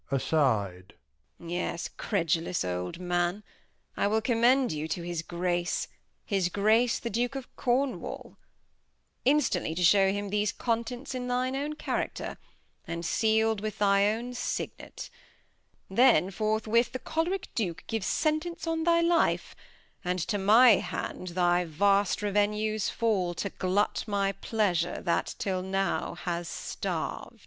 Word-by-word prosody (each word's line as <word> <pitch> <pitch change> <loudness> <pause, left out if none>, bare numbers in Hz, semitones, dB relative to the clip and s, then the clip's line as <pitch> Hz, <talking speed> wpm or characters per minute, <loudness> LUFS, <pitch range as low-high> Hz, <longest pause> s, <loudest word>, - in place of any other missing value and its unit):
Bast. 110 - 0 0.5
Yes, 170 0 -3
credulous 170 - 0
old 90 - -3
Man, 175 +2 -1 0.5
[Aside. - - -1
I - - +4
wiU 220 +1 +1
commend 245 +2 +3
you 155 0 -3
to 170 +2 -3
his 170 -1 -3
Grace, 175 +1 -1 0.4
His 195 -4 +1
Grace 220 +5 +3
the 235 - -5
Duke 245 +5 -1
of 270 -2 -7
Cornwal 260 +2 -2 0.9
instantly 255 - +2
To 180 - -1
shew 195 +2 +6
him 205 0 -3
these 210 -1 +1
Contents 240 +3 -2
in 250 -1 -4
thy 250 +1 0
own 285 +3 -2
Character, 305 - -3 0.5
And 170 0 -4
seal'd 220 +2 +2
with 215 0 -4
thy 200 0 +4
own 240 +3 -4
Signet; 245 - -5 0.8
then 195 -2 +4
forthwith 220 +3 +1
The - - -1
Chol'rick 345 +6 -2
Duke 180 -8 -2
gives 225 -3 -2
Sentence 315 +3 -1
on 325 -1 -1
thy 335 0 +4
Life; 335 0 +2 0.5
And 180 0 -1
to 205 - 0
my 220 +3 +7
Hand 185 - -5
thy 175 0 +2
vast 200 +5 +2
Revenues, 210 +1 0
To 200 -4 0
glut 190 +3 +1
my 200 -1 +1
Pleasure 185 -5 0
that 170 -2 0
'till 185 -2 -1
now 195 +1 -1
has 175 -1 -3
starv'd. - - -4
205 Hz, 135 wpm, -28 LUFS, 175-235 Hz, 0.9 s, my